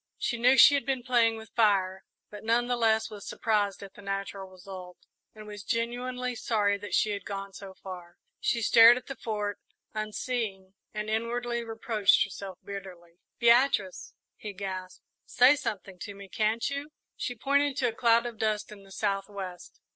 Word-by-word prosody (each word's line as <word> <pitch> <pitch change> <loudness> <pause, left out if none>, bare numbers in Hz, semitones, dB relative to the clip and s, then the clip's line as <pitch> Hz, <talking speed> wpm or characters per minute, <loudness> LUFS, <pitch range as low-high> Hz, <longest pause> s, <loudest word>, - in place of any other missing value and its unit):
She 235 - -2
knew 250 +3 +5
she 285 - +9
had 280 - +1
been 260 -1 -2
playing 235 -3 +3
with 220 -1 -11
fire, 190 -4 +2 0.3
but 210 -1 -9
none 230 +2 +2
the 245 0 0
less 220 -1 +2
was 205 -2 -9
surprised 205 -3 -1
at 195 - -10
the - - -13
natural 195 -1 -4
result, 185 -1 -10 0.4
and 215 0 -10
was 210 -1 -8
genuinely 245 +3 -2
sorry 205 -4 0
that 205 - -3
she 215 - +2
had 200 -2 -4
gone 195 0 -6
so 190 -1 -10
far. 180 -2 -10 0.2
She 235 -1 0
stared 230 +3 +8
at 255 - -8
the 270 - -6
Fort, 210 -4 -3 0.3
unseeing, 215 -2 -3 0.2
and 210 0 -4
inwardly 235 +2 -1
reproached 225 -2 +2
herself 190 -2 -7
bitterly. 180 -4 -9 0.2
"Beatrice!" 235 -5 +3 0.2
he 210 -1 -7
gasped. 185 -1 -6 0.2
"Say 255 +4 +6
something 195 -8 -5
to 205 - -7
me, 200 0 -11
can't 215 +4 0
you?" 280 +1 -4 0.3
She 245 - -4
pointed 280 +3 +1
to 250 -3 +2
a - - -6
cloud 235 0 +3
of 235 -3 -6
dust 215 -1 -1
in 205 -1 -11
the 195 0 -17
south 195 -1 -1
west. 190 -3 -8
215 Hz, 175 wpm, -28 LUFS, 195-235 Hz, 0.4 s, she